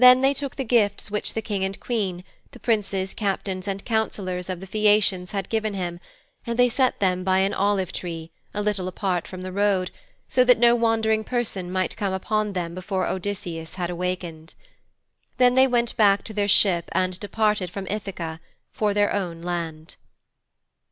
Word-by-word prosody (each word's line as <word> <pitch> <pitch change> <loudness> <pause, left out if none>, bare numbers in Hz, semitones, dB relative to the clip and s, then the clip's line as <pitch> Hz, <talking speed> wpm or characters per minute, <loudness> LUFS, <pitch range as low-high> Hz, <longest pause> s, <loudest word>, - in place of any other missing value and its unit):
Then 250 0 +9
they 270 +1 +4
took 280 -1 -4
the 270 - -2
gifts 220 -4 +1
which 210 - -2
the 225 - -2
King 200 -3 -2
and 190 0 -2
Queen, 195 -7 -2 0.3
the - - -12
Princes, 200 -4 0
Captains 195 -2 -2
and 195 0 -3
Councillors 190 -5 -1
of 185 -2 -3
the 190 - -8
Phæacians 205 -2 +2
had 195 -2 -3
given 215 -2 -1
him, 175 -2 -3 0.4
and 235 0 -3
they 245 0 +5
set 255 +1 +1
them 185 -2 +1
by 190 0 +3
an 195 +1 +2
olive 195 -2 +1
tree, 165 -2 -5 0.2
a 210 - -2
little 205 -3 0
apart 185 -1 -1
from 185 -1 -8
the 185 0 -5
road, 195 -2 +1 0.4
so 255 - +4
that 250 0 +6
no 235 +1 +6
wandering 225 -2 +2
person 215 -7 -2
might 185 0 -1
come 200 -3 -1
upon 210 +2 -1
them 170 -2 -3
before 185 +1 -2
Odysseus 180 -4 -4
had 180 -2 -2
awakened. 175 -2 -4 0.8
Then 250 -1 +5
they 260 +1 +6
went 240 -2 +1
back 200 -2 +4
to 220 - -6
their 205 -1 0
ship 190 -4 +4
and 185 -1 0
departed 210 -3 0
from 195 +2 -6
Ithaka 190 -6 -4 0.3
for 210 -2 0
their 205 0 +3
own 170 -4 -3
land. 165 -2 -4
195 Hz, 180 wpm, -24 LUFS, 185-215 Hz, 0.8 s, Then